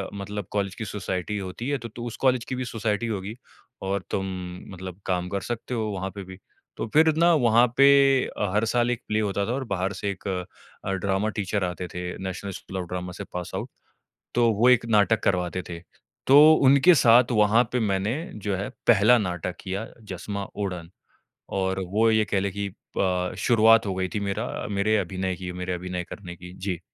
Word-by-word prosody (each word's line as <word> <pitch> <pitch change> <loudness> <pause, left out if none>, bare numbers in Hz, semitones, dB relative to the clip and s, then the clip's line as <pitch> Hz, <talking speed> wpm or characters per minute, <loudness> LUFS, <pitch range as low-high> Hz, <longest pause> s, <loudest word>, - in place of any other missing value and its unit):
मतलब 100 0 -5
कॉलेज 100 -2 -1
की 110 - -5
सोसाइटी 95 0 -3
होती 100 +5 -5
है, 145 - +1
तो 120 -2 -8
तो 120 +2 -8
उस 120 - -5
कॉलेज 130 -3 +2
की 130 - -2
भी 130 0 -3
सोसाइटी 115 -1 -2
होगी, 105 -1 -4 0.5
और 95 0 -2
तुम 95 - -1 0.5
मतलब 95 +1 -8
काम 90 -1 -1
कर 100 0 -2
सकते 120 +1 -4
हो, 115 -2 -1
वहाँ 95 -1 -3
पे 100 - -6
भी।" 95 0 -11 0.4
तो - - -3
फिर 160 +1 +5
ना, 170 +1 +5
वहाँ 120 -4 +4
पे 140 0 +7 0.4
अ, 100 - -3
हर 105 +2 +2
साल 120 0 +2
एक 120 0 -3
प्ले 110 - 0
होता 100 -1 0
था, - - -1
और 135 +1 -2
बाहर 95 +1 -1
से 100 - -1
एक 100 - -8
अ, 95 0 -6
ड्रामा 95 +2 0
टीचर 100 0 -1
आते 90 0 -3
थे, 90 0 -4 0.2
नेशनल 95 +1 -5
स्कूल 95 - -7
ऑफ - - -11
ड्रामा 90 0 -4
से - - -3
पास 90 -1 -5
आउट। - - -4 0.7
तो 120 -1 +4
वो 110 +4 +3
एक 125 -2 +5
नाटक 105 +1 +3
करवाते 90 0 0
थे। 85 -1 -6 0.5
तो 145 +4 +8
उनके 140 +7 +7
साथ, 120 -3 +5
वहाँ 110 +2 +4
पे 125 - +1
मैंने, 100 +1 0 0.2
जो 100 -2 -2
है, 100 +2 -3 0.2
पहला 115 +2 +6
नाटक 90 -3 -3
किया, 100 +4 -4 0.3
जसमा 100 +2 -4
उड़न। 90 -5 -4 0.7
और 95 0 0
वो 110 +2 +4
ये 110 -1 +3
कह 100 -2 0
लें 100 0 -2
कि 100 +1 -3 0.3
प 90 -1 0
शुरुआत 115 -2 +5
हो 95 - -1
गई 95 0 -1
थी 105 - -1
मेरा 100 -1 -2 0.3
मेरे 105 +2 +1
अभिनय 95 -1 -2
की, 90 -1 -6
मेरे 90 0 -4
अभिनय 90 0 -4
करने 90 -4 -8
की। 90 +1 -11
जी। 95 -2 -4
100 Hz, 205 wpm, -25 LUFS, 95-115 Hz, 0.7 s, तो